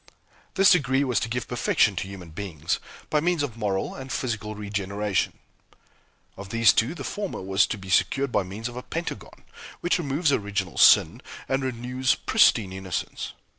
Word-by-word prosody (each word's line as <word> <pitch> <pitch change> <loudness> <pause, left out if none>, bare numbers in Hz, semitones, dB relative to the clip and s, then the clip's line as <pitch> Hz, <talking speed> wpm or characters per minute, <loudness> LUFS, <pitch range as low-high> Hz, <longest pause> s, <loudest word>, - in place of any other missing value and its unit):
This 195 +1 +6
degree 140 -6 +3
was 125 -5 +1
to 115 - -3
give 120 +1 -3
perfection 110 -4 +2
to 95 - -2
human 95 -4 -10
beings, 85 -3 -3 0.3
by 150 - +3
means 170 -1 +1
of 130 -6 -4
moral 100 -4 -2
and 130 0 -8
physical 110 -4 -3
regeneration. 100 -1 -2 1.0
Of 100 0 -9
these 115 -1 +5
two 120 +9 +1
the - - -7
former 205 -2 -4
was 95 +1 +3
to - - -3
be 95 -1 -8
secured 135 +6 +2
by - - +2
means 100 +5 -6
of 120 - -8
a 125 - -5
Pentagon, 165 +6 -6 0.4
which 175 - +1
removes 145 0 0
original 100 - -2
sin - - +6 0.3
and 135 0 0
renews 125 +1 0
pristine 95 -5 +3
innocence. 95 -2 -5
115 Hz, 170 wpm, -25 LUFS, 100-135 Hz, 1.0 s, This